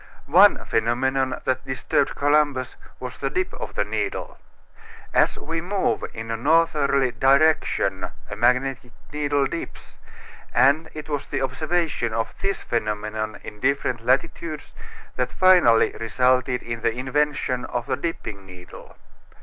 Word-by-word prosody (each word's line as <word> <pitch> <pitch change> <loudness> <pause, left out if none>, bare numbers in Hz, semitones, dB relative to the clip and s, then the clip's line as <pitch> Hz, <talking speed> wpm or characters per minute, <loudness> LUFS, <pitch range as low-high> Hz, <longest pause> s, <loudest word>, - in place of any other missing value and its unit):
One - - +5
phenomenon 130 +4 0
that 130 0 0
disturbed 135 +1 -1
Columbus 145 -3 +1 0.2
was - - -7
the - - -1
dip 370 0 -2
of - - -7
the - - +1
needle. 410 -2 -4 0.7
As - - +3
we 165 0 -4
move 190 +3 -1
in 115 0 -6
a - - 0
northerly 140 -2 +2
direction 130 - +2 0.2
a 105 - -6
magnetic 125 +2 +1 0.2
needle 145 -1 +1
dips, 165 +5 -7 0.6
and 140 +6 +4
it 155 -1 -7
was 145 -2 -3
the - - -2
observation 150 -4 -1
of 115 - -2
this 195 0 -2
phenomenon 110 -1 -3
in 105 - -9
different 130 -3 0
latitudes 145 +5 -1 0.4
that 125 -1 -1
finally 180 -12 +5
resulted 125 +2 +1
in 115 -1 -5
the 115 - +2
invention 130 -1 -1
of 120 -1 -3
the - - -1
dipping 110 -12 -5
needle. 90 -1 -13
130 Hz, 135 wpm, -23 LUFS, 115-150 Hz, 0.7 s, One